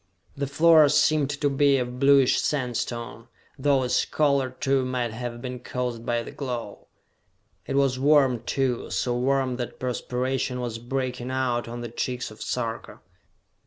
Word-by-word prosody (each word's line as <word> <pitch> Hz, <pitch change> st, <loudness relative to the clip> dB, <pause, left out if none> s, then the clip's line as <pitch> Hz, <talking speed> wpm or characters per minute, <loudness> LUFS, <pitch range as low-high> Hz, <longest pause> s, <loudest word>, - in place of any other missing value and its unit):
The 140 Hz, 0 st, -2 dB
floor 155 Hz, +1 st, +6 dB
seemed 150 Hz, -1 st, +3 dB
to 145 Hz, 0 st, -1 dB
be 140 Hz, 0 st, +3 dB
of 125 Hz, 0 st, -3 dB
bluish 135 Hz, -1 st, +5 dB
sandstone, 120 Hz, -3 st, -3 dB, 0.3 s
though 135 Hz, -1 st, +2 dB
its 125 Hz, -, +1 dB
color, 140 Hz, -3 st, +1 dB
too, 135 Hz, +1 st, 0 dB
might 125 Hz, -2 st, -2 dB
have 120 Hz, +1 st, -6 dB
been 125 Hz, -1 st, -5 dB
caused 125 Hz, -2 st, -4 dB
by 120 Hz, -1 st, 0 dB
the -, -, -9 dB
glow. 120 Hz, -6 st, -6 dB, 0.8 s
It 135 Hz, -, -2 dB
was 135 Hz, -2 st, +2 dB
warm, 135 Hz, -4 st, +4 dB
too, 125 Hz, 0 st, -1 dB
so 120 Hz, -1 st, -1 dB
warm 130 Hz, 0 st, 0 dB
that 120 Hz, -2 st, -6 dB
perspiration 125 Hz, +1 st, -2 dB
was 120 Hz, -2 st, -4 dB
breaking 125 Hz, 0 st, -3 dB
out 125 Hz, -3 st, -1 dB
on 120 Hz, +1 st, -6 dB
the 120 Hz, -, -5 dB
cheeks 120 Hz, +1 st, -3 dB
of 110 Hz, -, -13 dB
Sarka. 115 Hz, -2 st, -4 dB
125 Hz, 155 wpm, -25 LUFS, 120-135 Hz, 0.8 s, floor